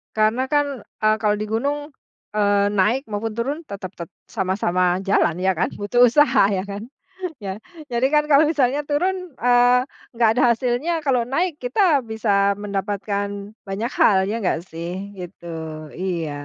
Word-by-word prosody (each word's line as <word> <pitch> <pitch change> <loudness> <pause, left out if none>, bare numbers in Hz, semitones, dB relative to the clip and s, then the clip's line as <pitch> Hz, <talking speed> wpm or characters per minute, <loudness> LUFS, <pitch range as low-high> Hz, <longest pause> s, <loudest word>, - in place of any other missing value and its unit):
Karena 220 +4 +2
kan, 285 -5 0
eee, 215 0 0
kalau 210 -1 +2
di 215 - -3
gunung, 285 +7 -1 0.5
eee, 205 -1 +3
naik 210 +7 +1
maupun 215 +1 -3
turun 245 +8 -2
tetap 200 - -7
tet 170 -2 -8 0.2
sama-sama 185 -2 0
jalan 175 -3 +2
ya 190 0 +1
kan, 170 - 0
butuh 240 +4 +3
usaha 245 -4 +5
ya 190 -2 -1
kan? 200 +1 -6 0.6
Ya, 190 0 -4 0.3
jadi 240 +2 +1
kan 300 0 +5
kalau 285 +2 +7
misalnya 280 -2 +1
turun, 355 +6 +1 0.2
eee, 245 +1 +5 0.4
nggak 230 -1 +4
ada 250 - +2
hasilnya, 255 +8 0
kalau 255 -3 +3
naik 330 +7 0
kita 285 - +3
bisa 205 -3 +1
mendapatkan 200 0 -3
banyak 210 +6 -3
hal, 200 - +6
ya 210 - -2
nggak 180 -3 +1
sih 180 +5 -6
gitu. 180 -1 -9 0.5
Iya. 175 -4 -2
215 Hz, 155 wpm, -22 LUFS, 195-255 Hz, 0.6 s, kalau